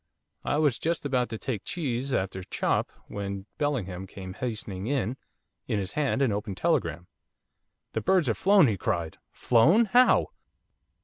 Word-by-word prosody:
I - - 0
was 150 -6 +2
just 165 -2 -1
about 125 -4 +1
to 110 - -4
take 110 -3 -4
cheese 135 -5 -2
after 95 -4 -1
chop - - -1 0.2
when 100 -1 -5
Bellingham 95 -11 -2
came 95 -1 -8
hastening 105 -4 -5
in, 130 -4 0 0.5
in 105 - 0
his 95 -1 -3
hand 140 -2 +1
an 130 - +2
open 105 -1 -3
telegram. 85 -2 0 0.9
'The - - -1
birds 185 -4 +3
have 115 - 0
flown,' 195 -3 +6
he 110 -6 +1
cried. 85 -2 -2
'Flown! 155 - +4
How? 245 +4 +4
115 Hz, 150 wpm, -27 LUFS, 95-145 Hz, 0.9 s, flown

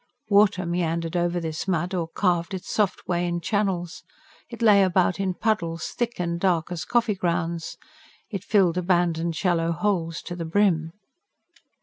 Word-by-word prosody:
Water 200 -3 +4
meandered 170 -1 -1
over 175 0 +1
this 160 +1 -4
mud, 180 0 -1
or 170 -3 -1
carved 175 +1 0
its 185 - -7
soft 210 -3 0
way 175 0 0
in 175 0 -1
channels; 180 -2 -1 0.5
it 235 -1 -6
lay 205 -3 +6
about 185 0 +2
in 190 -2 -1
puddles, 170 -7 -1
thick 240 -3 -3
and 170 -1 -1
dark 175 -2 +1
as 175 -1 -4
coffee 235 -3 +2
grounds; 170 -3 -2 0.5
it 195 -3 -4
filled 185 -5 +3
abandoned 170 -2 +1
shallow 170 -2 +1
holes 165 -2 -1
to 175 - -6
the 170 - -4
brim. 165 -2 +1
175 Hz, 155 wpm, -25 LUFS, 170-195 Hz, 0.5 s, lay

